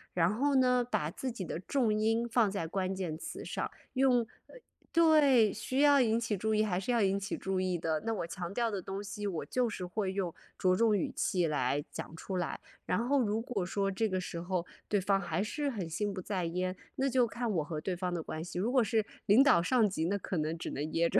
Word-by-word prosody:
然 175 Hz, +2 st, +3 dB
后 280 Hz, +5 st, +1 dB
呢， 250 Hz, -1 st, +4 dB
把 160 Hz, -10 st, -1 dB
自 255 Hz, +7 st, -4 dB
己 200 Hz, -5 st, -5 dB
的 165 Hz, -, -4 dB
重 225 Hz, +3 st, +1 dB
音 225 Hz, +2 st, +1 dB
放 230 Hz, -2 st, +3 dB
在 195 Hz, -4 st, -3 dB
关 190 Hz, +3 st, -2 dB
键 180 Hz, -5 st, -3 dB
词 160 Hz, -, -7 dB
上。 -, -, -3 dB, 0.2 s
用 255 Hz, -2 st, +4 dB, 0.3 s
呃， -, -, -16 dB, 0.4 s
对， 290 Hz, -10 st, +5 dB
需 255 Hz, +5 st, -3 dB
要 285 Hz, -1 st, +6 dB
引 225 Hz, -1 st, +2 dB
起 225 Hz, -2 st, -1 dB
注 220 Hz, +3 st, 0 dB
意， 215 Hz, -, +3 dB
还 185 Hz, -4 st, 0 dB
是 195 Hz, +6 st, -2 dB
要 235 Hz, -2 st, +3 dB
引 195 Hz, 0 st, +2 dB
起 200 Hz, -, -4 dB
注 190 Hz, -1 st, -2 dB
意 185 Hz, -1 st, 0 dB
的。 160 Hz, -1 st, -1 dB
那 225 Hz, -, 0 dB
我 180 Hz, -, -2 dB
强 175 Hz, 0 st, -5 dB
调 230 Hz, +2 st, 0 dB
的 195 Hz, -3 st, -3 dB
东 195 Hz, +2 st, -5 dB
西， 205 Hz, 0 st, -4 dB
我 175 Hz, -5 st, -3 dB
就 250 Hz, -2 st, 0 dB
是 185 Hz, -4 st, -5 dB
会 190 Hz, +1 st, -2 dB
用 190 Hz, -3 st, -2 dB, 0.2 s
着 185 Hz, -1 st, +3 dB
重 220 Hz, +1 st, +3 dB
语 185 Hz, -, -1 dB
气 180 Hz, -2 st, +1 dB
来 145 Hz, -2 st, 0 dB
讲 165 Hz, -, -7 dB
出 185 Hz, +3 st, -4 dB
来。 175 Hz, -2 st, -2 dB, 0.3 s
然 220 Hz, +6 st, 0 dB
后 280 Hz, 0 st, +3 dB
如 220 Hz, -1 st, 0 dB
果 230 Hz, -5 st, -2 dB
说 195 Hz, +2 st, -1 dB
这 220 Hz, +4 st, 0 dB
个 185 Hz, -1 st, 0 dB
时 175 Hz, -2 st, -5 dB
候， 175 Hz, -1 st, -2 dB, 0.2 s
对 205 Hz, -, +2 dB
方 195 Hz, +1 st, +2 dB
还 175 Hz, +1 st, -1 dB
是 285 Hz, +6 st, -2 dB
很 205 Hz, -10 st, -4 dB
心 205 Hz, +5 st, -1 dB
不 190 Hz, -, -5 dB
在 185 Hz, -2 st, -2 dB
焉， 180 Hz, +2 st, -2 dB, 0.2 s
那 270 Hz, -, +1 dB
就 250 Hz, -2 st, +3 dB
看 235 Hz, +1 st, -2 dB
我 165 Hz, -6 st, +1 dB
和 155 Hz, -1 st, -4 dB
对 185 Hz, +1 st, -2 dB
方 180 Hz, 0 st, -2 dB
的 170 Hz, -2 st, -2 dB
关 155 Hz, +1 st, -5 dB
系。 175 Hz, -, -7 dB
如 210 Hz, +7 st, 0 dB
果 255 Hz, -2 st, +4 dB
是 220 Hz, 0 st, +1 dB, 0.2 s
领 225 Hz, +7 st, +7 dB
导 280 Hz, -, +5 dB
上 220 Hz, +5 st, +3 dB
级， 165 Hz, -4 st, -2 dB
那 200 Hz, +3 st, +1 dB
可 185 Hz, -, -4 dB
能 155 Hz, +1 st, -1 dB
只 165 Hz, -, -5 dB
能 140 Hz, -, -4 dB
噎 170 Hz, 0 st, +2 dB
着。 -, -, +3 dB
200 Hz, 265 characters per minute, -32 LUFS, 180-230 Hz, 0.4 s, 领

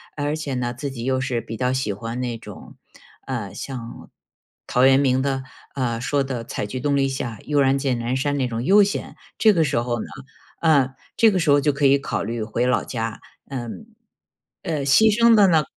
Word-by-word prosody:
而 145 Hz, 0 st, -1 dB
且 155 Hz, -3 st, -4 dB
呢， 125 Hz, -1 st, -2 dB
自 140 Hz, +3 st, -5 dB
己 125 Hz, -4 st, -7 dB
又 130 Hz, +1 st, 0 dB
是 130 Hz, -3 st, -2 dB
比 115 Hz, 0 st, -7 dB
较 125 Hz, +2 st, 0 dB
喜 130 Hz, -5 st, -1 dB
欢 115 Hz, +5 st, -5 dB
那 120 Hz, -2 st, -3 dB
种， -, -, -12 dB, 0.5 s
呃， 115 Hz, -8 st, -4 dB
像， 120 Hz, 0 st, -8 dB, 0.6 s
陶 125 Hz, +1 st, +3 dB
渊 135 Hz, 0 st, +6 dB
明 130 Hz, -2 st, +2 dB
的， 135 Hz, -1 st, -1 dB, 0.3 s
啊， 120 Hz, -4 st, -2 dB
说 140 Hz, +3 st, 0 dB
的 125 Hz, -4 st, -5 dB
采 -, -, -4 dB
菊 115 Hz, +5 st, -5 dB
东 140 Hz, +2 st, 0 dB
篱 135 Hz, -1 st, +2 dB
下， 120 Hz, -5 st, -4 dB
悠 145 Hz, -1 st, 0 dB
然 135 Hz, 0 st, +3 dB
见 135 Hz, -3 st, -1 dB
南 120 Hz, +2 st, -2 dB
山 145 Hz, +2 st, 0 dB
那 130 Hz, -2 st, 0 dB
种 115 Hz, 0 st, -3 dB
悠 200 Hz, +9 st, +6 dB
闲。 200 Hz, 0 st, -2 dB, 0.2 s
这 220 Hz, -, +5 dB
个 165 Hz, -4 st, +3 dB
时 140 Hz, -3 st, -1 dB
候 120 Hz, -1 st, -2 dB
呢， -, -, -5 dB, 0.5 s
呃， 140 Hz, -5 st, +3 dB, 0.2 s
这 225 Hz, -1 st, +6 dB
个 190 Hz, -, 0 dB
时 165 Hz, -3 st, 0 dB
候 145 Hz, 0 st, +6 dB
就 150 Hz, -, +2 dB
可 140 Hz, 0 st, 0 dB
以 140 Hz, +1 st, +5 dB
考 140 Hz, -, -3 dB
虑 115 Hz, +1 st, -3 dB
回 115 Hz, +3 st, -1 dB
老 125 Hz, -, +1 dB
家。 115 Hz, -2 st, -4 dB, 0.3 s
嗯， 130 Hz, -, -6 dB, 0.8 s
呃， 155 Hz, -5 st, -2 dB
牺 140 Hz, +11 st, +5 dB
牲 235 Hz, 0 st, +6 dB
的 205 Hz, -2 st, +6 dB
呢 160 Hz, -3 st, +3 dB
130 Hz, 230 characters per minute, -22 LUFS, 120-145 Hz, 0.8 s, 渊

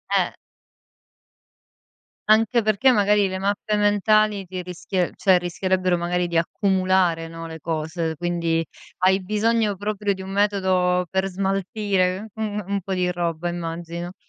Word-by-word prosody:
Eh. -, -, +1 dB, 2.0 s
Anche 225 Hz, +2 st, +4 dB
perché 215 Hz, +5 st, +3 dB
magari 205 Hz, -1 st, +3 dB
le 190 Hz, 0 st, -4 dB
mappe 205 Hz, +2 st, -1 dB
mentali 205 Hz, -1 st, +2 dB
ti 180 Hz, 0 st, -5 dB
rischie 180 Hz, 0 st, -2 dB
cioè 190 Hz, -2 st, +4 dB
rischierebbero 185 Hz, 0 st, 0 dB
magari 175 Hz, +1 st, -1 dB
di 170 Hz, -, 0 dB
accumulare, 185 Hz, -2 st, +1 dB
no, 165 Hz, 0 st, -8 dB
le 160 Hz, 0 st, -8 dB
cose. 160 Hz, +1 st, -3 dB
Quindi 170 Hz, -1 st, -1 dB, 0.3 s
hai 190 Hz, +1 st, +3 dB
bisogno 215 Hz, +1 st, +1 dB
proprio 205 Hz, 0 st, -1 dB
di 190 Hz, -, -8 dB
un 190 Hz, -, -8 dB
metodo 190 Hz, -3 st, +1 dB
per 190 Hz, 0 st, 0 dB
smaltire 195 Hz, +1 st, -1 dB
un 210 Hz, -2 st, -3 dB
un 200 Hz, 0 st, -1 dB
po' 190 Hz, +2 st, -4 dB
di 180 Hz, -1 st, 0 dB
roba, 170 Hz, -1 st, -2 dB
immagino. 170 Hz, +1 st, -5 dB
185 Hz, 135 wpm, -23 LUFS, 175-205 Hz, 2.0 s, Anche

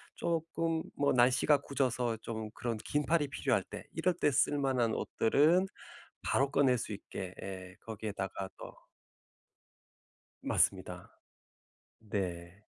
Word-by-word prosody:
쪼끔 165 Hz, -1 st, -1 dB
뭐 145 Hz, -, +2 dB
날씨가 125 Hz, +4 st, +5 dB
궂어서 125 Hz, -4 st, 0 dB
좀 110 Hz, -1 st, -5 dB
그런 115 Hz, -1 st, -3 dB
긴팔이 150 Hz, +7 st, +1 dB
필요할 -, -, +1 dB
때 -, -, -8 dB
이럴 170 Hz, +3 st, +1 dB
때 165 Hz, -4 st, +2 dB
쓸 145 Hz, +1 st, +3 dB
만한 130 Hz, -5 st, +1 dB
옷들은 155 Hz, -, +3 dB, 0.5 s
바로 140 Hz, +1 st, +2 dB
꺼낼 135 Hz, -3 st, +4 dB
수 110 Hz, -, -4 dB
있게 95 Hz, -2 st, -6 dB
예 95 Hz, -1 st, -7 dB
거기에다가 100 Hz, -3 st, -4 dB
또 -, -, -9 dB, 1.7 s
맞습니다. -, -, 0 dB, 0.8 s
네. 95 Hz, -3 st, -4 dB
125 Hz, 220 characters per minute, -33 LUFS, 105-145 Hz, 1.7 s, 날씨가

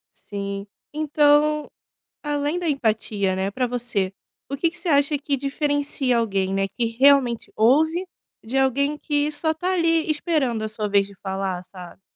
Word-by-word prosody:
Sim. 200 Hz, 0 st, -6 dB, 0.3 s
Então 300 Hz, 0 st, +3 dB, 0.6 s
além 295 Hz, +2 st, -1 dB
da 345 Hz, -2 st, -2 dB
empatia, 215 Hz, -7 st, 0 dB
né, 190 Hz, +1 st, -1 dB
para 250 Hz, +4 st, -1 dB
você, 235 Hz, -6 st, -2 dB, 0.4 s
o 275 Hz, -, -2 dB
que 335 Hz, +4 st, +2 dB
que 350 Hz, -, -10 dB
você 345 Hz, 0 st, -6 dB
acha 285 Hz, +1 st, +3 dB
que 280 Hz, -1 st, -2 dB
diferencia 285 Hz, -2 st, 0 dB
alguém, 195 Hz, -4 st, 0 dB
né, 195 Hz, 0 st, +1 dB
que 235 Hz, -, +2 dB, 0.2 s
realmente 270 Hz, -4 st, +4 dB
ouve 315 Hz, +10 st, +3 dB, 0.4 s
de 245 Hz, +5 st, -1 dB
alguém 280 Hz, +3 st, +1 dB
que 295 Hz, 0 st, 0 dB
só 315 Hz, +2 st, -1 dB
tá 360 Hz, +4 st, -1 dB
ali 330 Hz, -3 st, +2 dB
esperando 290 Hz, -8 st, 0 dB
a 215 Hz, -, -2 dB
sua 215 Hz, 0 st, -4 dB
vez 200 Hz, -1 st, +3 dB
de 200 Hz, -, -14 dB
falar, 190 Hz, -2 st, -3 dB
sabe? 180 Hz, 0 st, -12 dB
275 Hz, 165 wpm, -23 LUFS, 205-300 Hz, 0.6 s, realmente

